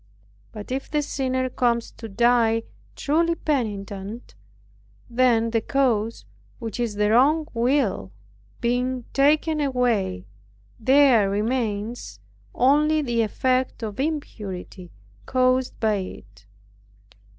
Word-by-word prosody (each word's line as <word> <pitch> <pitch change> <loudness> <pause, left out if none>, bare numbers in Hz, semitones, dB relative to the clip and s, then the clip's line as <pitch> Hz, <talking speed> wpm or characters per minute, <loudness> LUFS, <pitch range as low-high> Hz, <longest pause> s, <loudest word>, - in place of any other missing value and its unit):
But 210 +2 -9
if 265 +1 -3
the 300 -1 0
sinner 260 -2 -1
comes 235 -2 0
to 225 - -10
die 230 +1 +3 0.3
truly 335 +3 +1
penitent, 210 -7 -3 0.7
then 235 -2 +2
the 225 -1 +1
cause, 230 -4 0 0.3
which 230 -1 -6
is 235 -4 -1
the 210 0 +1
wrong 295 +7 +4
will, 235 - 0 0.5
being 250 +1 -1
taken 305 +2 +3
away, 240 - 0 0.5
there 255 -4 +5
remains 210 - -2 0.4
only 300 +4 +3
the 240 -3 0
effect 255 +3 0
or 215 -2 -3
impurity 210 - -5 0.4
caused 255 0 +1
by 215 -2 +2
it. 100 - -9
240 Hz, 105 wpm, -24 LUFS, 215-265 Hz, 0.7 s, there